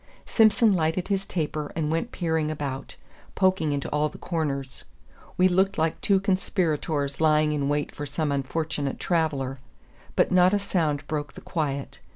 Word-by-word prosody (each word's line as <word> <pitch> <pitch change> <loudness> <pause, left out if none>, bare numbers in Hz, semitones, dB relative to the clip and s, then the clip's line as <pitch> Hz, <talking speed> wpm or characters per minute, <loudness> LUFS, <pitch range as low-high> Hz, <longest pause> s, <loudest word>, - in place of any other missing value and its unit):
Simson 220 -1 +4
lighted 170 +2 0
his 195 -1 0
taper 155 -3 -3
and 155 -1 -1
went 165 +10 -1
peering 160 -3 0
about, 140 -3 -4 0.4
poking 185 -5 +2
into 140 -1 -2
all 150 +1 +1
the - - -12
corners. 140 -6 -3 0.5
We 185 - +5
looked 190 +2 +2
like 160 0 0
two 195 -2 +3
conspirators 165 -7 -1
lying 155 -1 +4
in 140 -1 0
wait 145 0 -1
for 145 - -5
some 150 +1 -1
unfortunate 140 0 -2
traveller; 140 -6 0 0.6
but - - +3
not 185 +2 +5
a - - +3
sound 160 -7 -1
broke 145 -1 -3
the - - -11
quiet. 140 -4 -3
155 Hz, 160 wpm, -26 LUFS, 145-180 Hz, 0.6 s, We